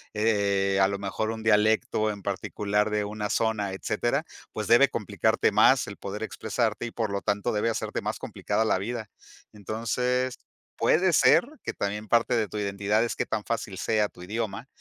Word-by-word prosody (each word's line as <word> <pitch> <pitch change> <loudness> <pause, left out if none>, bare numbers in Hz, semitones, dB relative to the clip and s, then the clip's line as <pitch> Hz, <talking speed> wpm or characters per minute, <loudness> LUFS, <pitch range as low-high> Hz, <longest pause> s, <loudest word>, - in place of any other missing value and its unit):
eh, 100 -3 +2
a 95 - +6
lo 100 0 -2
mejor 100 +2 -3
un 110 0 -5
dialecto 110 0 +2
en 100 -2 -6
particular 105 +1 -1
de 105 0 0
una 105 0 -4
zona, 105 -4 0
etcétera, 120 +9 -1 0.3
pues, 110 - -4
debe 120 +4 +6
complicarte 110 +1 +1
más 110 +5 +5
el 100 - -8
poder 105 +2 -5
expresarte, 110 +1 -2
y - - -7
por 110 -3 -2
lo 100 - -2
tanto, 105 +3 0
debe 105 +2 +1
hacerte 115 - -3
más - - -3
complicada 110 - -2
la 100 - +2
vida. 110 +1 -4 0.4
Entonces, 125 +5 -1 0.4
puede 180 +2 +3
ser - - +5 0.2
que - - -3
también 105 +2 -3
parte 120 +2 +3
de 110 -2 +1
tu 105 - -7
identidad 100 +1 0
es 120 - -2
qué - - -1
tan 110 -1 -2
fácil 110 -4 -3
sea 105 0 +1
tu 90 - -13
idioma, 110 +4 -4
105 Hz, 180 wpm, -27 LUFS, 100-115 Hz, 0.4 s, a